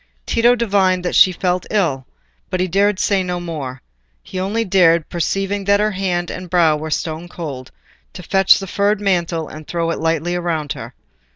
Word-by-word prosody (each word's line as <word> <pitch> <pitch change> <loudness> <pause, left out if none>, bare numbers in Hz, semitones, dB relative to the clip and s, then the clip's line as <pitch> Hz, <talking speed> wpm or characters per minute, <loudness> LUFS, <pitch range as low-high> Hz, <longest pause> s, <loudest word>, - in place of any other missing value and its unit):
Tito 240 +1 +3
divined 195 -5 +1
that 175 - -1
she 185 - +6
felt 180 0 -1
ill, 155 -11 0 0.4
but 185 - -2
he 185 - +1
dared 200 +2 +2
say 200 -1 +1
no 180 -1 -3
more; 145 -7 -6 0.4
he 185 - -6
only 210 +5 -1
dared, 170 -4 +3
perceiving 195 +4 -2
that 200 +1 +3
her 215 +1 +1
hand 180 -3 -2
and 185 -1 -7
brow 165 -3 +4
were 155 +1 -5
stone 160 +2 -3
cold, 145 -8 -7 0.4
to 180 - -9
fetch 195 +2 +4
a 195 - -5
furred 200 +2 0
mantle 170 -5 0
and 155 0 -11
throw 170 -1 -1
it - - -3
lightly 165 +2 0
round 160 -4 -2
her. 120 -2 -9
180 Hz, 185 wpm, -19 LUFS, 165-195 Hz, 0.4 s, she